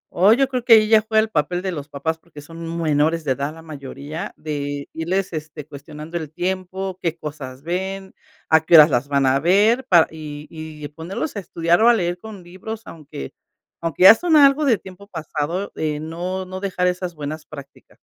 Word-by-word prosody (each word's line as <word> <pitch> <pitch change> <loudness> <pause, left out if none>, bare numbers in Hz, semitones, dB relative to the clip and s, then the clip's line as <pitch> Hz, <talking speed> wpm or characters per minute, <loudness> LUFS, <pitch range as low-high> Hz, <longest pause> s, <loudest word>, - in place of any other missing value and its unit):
O 190 +5 +5
yo 270 +2 +2
creo 255 -2 -3
que 240 -2 +6
ahí 215 -1 +6
ya 220 -1 +6
fue 220 0 -2
el 220 0 +1
papel 175 +1 -1
de 190 - -2
los 145 -3 -7
papás 160 +4 -3
porque 155 -3 -13
son 165 +2 -7
menores 155 +1 +1
de 135 - -1
edad 140 +3 -2
la 165 - -13
mayoría 145 +1 -7
de 145 -2 -4
irles, 180 +3 -2
este, 155 -1 -6
cuestionando 150 +3 -8
el 155 -3 -6
tiempo, 185 +1 -3
qué 170 -1 -2
cosas 140 -4 -8
ven, 190 +3 -4 0.4
a 160 0 +5
qué 170 - +4
horas 155 -1 +9
las 125 +2 +1
van 140 -1 +1
a 135 +1 +3
ver 210 - +3
pa 170 -3 +6
y 150 -1 -8
y 155 -2 -8
ponerlos 170 - -5
a - - -2
estudiar 170 0 +1
o 235 - +6
a - - +7
leer 175 -4 -1
con 205 -3 -10
libros, 200 +5 -8
aunque 145 - -9 0.5
aunque 165 0 -1
ya 200 +4 +11
son 330 0 +2
algo 280 +1 +6
de 235 -6 +4
tiempo 190 +1 -13
pasado 165 +1 -4
de 150 -1 -2
no 175 +4 -4
no 185 +1 -7
dejar 185 -2 0
esas 180 -1 -2
buenas 150 +1 -6
prácticas. 140 -2 -13
165 Hz, 200 wpm, -21 LUFS, 150-190 Hz, 0.5 s, ya